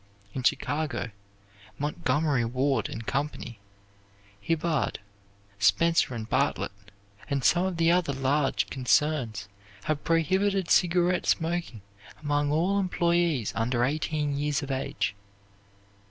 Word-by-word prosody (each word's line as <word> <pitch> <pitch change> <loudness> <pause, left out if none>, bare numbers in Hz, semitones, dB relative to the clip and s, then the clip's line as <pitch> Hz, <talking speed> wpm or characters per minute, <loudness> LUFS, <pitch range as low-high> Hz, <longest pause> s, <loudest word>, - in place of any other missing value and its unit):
In 130 - -3
Chicago, 145 -1 -1 0.7
Montgomery 145 -2 0
Ward 130 +4 0
and 115 0 -6
Company, 135 -5 -3 0.8
Hibbard, 155 0 0 0.6
Spencer 165 +4 +3
and 110 -2 -5
Bartlett, - - 0 0.6
and 140 -3 -1
some 175 +6 +4
of 185 -3 -4
the 165 0 +4
other 175 -4 +2
large 135 +1 +1
concerns 130 -5 +1 0.4
have 150 +2 -2
prohibited 190 +3 +1
cigarette 180 0 +3
smoking 165 - -1 0.4
among 145 -1 0
all 180 +6 +2
employees 170 - +1
under 120 +1 +1
eighteen 150 +1 -1
years 145 0 -1
of 140 - -4
age. 130 -5 -2
150 Hz, 110 wpm, -27 LUFS, 130-170 Hz, 0.8 s, some